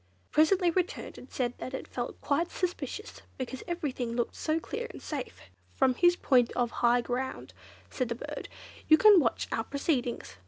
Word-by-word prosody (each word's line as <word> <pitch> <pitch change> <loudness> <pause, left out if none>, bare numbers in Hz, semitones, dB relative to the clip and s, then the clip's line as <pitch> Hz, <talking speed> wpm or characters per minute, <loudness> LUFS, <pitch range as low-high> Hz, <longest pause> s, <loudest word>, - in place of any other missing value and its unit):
It - - -39
presently 345 +3 +4
returned 370 +6 -2
and 255 - -14
said 245 -2 -1
that 255 - -5
it - - -6
felt 245 -1 -5
quite 330 +4 +1
suspicious, 360 - -4 0.2
because 260 0 -5
everything 275 -9 -2
looked 240 -1 -1
so 315 +1 0
clear 470 +8 -5
and - - -9
safe. 285 -5 -6 0.3
"From 255 - +4
his 350 +7 +4
point 250 -8 +3
of 240 -1 0
high 240 0 +3
ground," 255 +2 -4 0.4
said 255 -3 -2
the 235 - -1
bird, - - -7 0.4
"you 315 - +8
can 415 +1 +8
watch 240 -7 0
our 225 - 0
proceedings. 275 -3 -2
270 Hz, 180 wpm, -30 LUFS, 245-345 Hz, 0.4 s, you